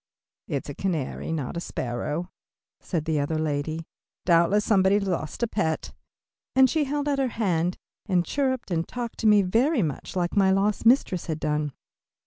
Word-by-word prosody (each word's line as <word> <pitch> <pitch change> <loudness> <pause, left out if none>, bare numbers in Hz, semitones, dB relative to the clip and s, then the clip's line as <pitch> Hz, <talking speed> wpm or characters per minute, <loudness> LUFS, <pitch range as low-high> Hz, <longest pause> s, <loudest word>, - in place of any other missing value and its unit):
"It's - - -3
a - - -5
canary, 165 -6 -3
not 150 -4 -3
a - - -1
sparrow," 150 +7 -3 0.5
said 165 -5 -3
the 160 -2 +1
other 145 +3 -1
lady, 155 +1 -2 0.4
"doubtless, 175 +4 +4
somebody's 200 0 +3
lost 170 +3 -2
pet," 160 -6 -1 0.6
and 265 0 +7
she 300 +3 +1
held 290 +1 -2
out 280 -1 +1
her 270 - +2
hand, 180 -7 0 0.3
and 180 -3 +2
chirped 260 -6 -1
and 165 -1 0
talked 240 -2 -5
to 225 - +2
me 210 -1 +6
very 235 - +2
much 150 +2 -4
like 175 +1 -1
my 195 -2 +4
lost 200 +3 +2
mistress 230 -8 +3
had 160 -2 -2
done. 150 -2 -1
185 Hz, 165 wpm, -26 LUFS, 160-225 Hz, 0.6 s, and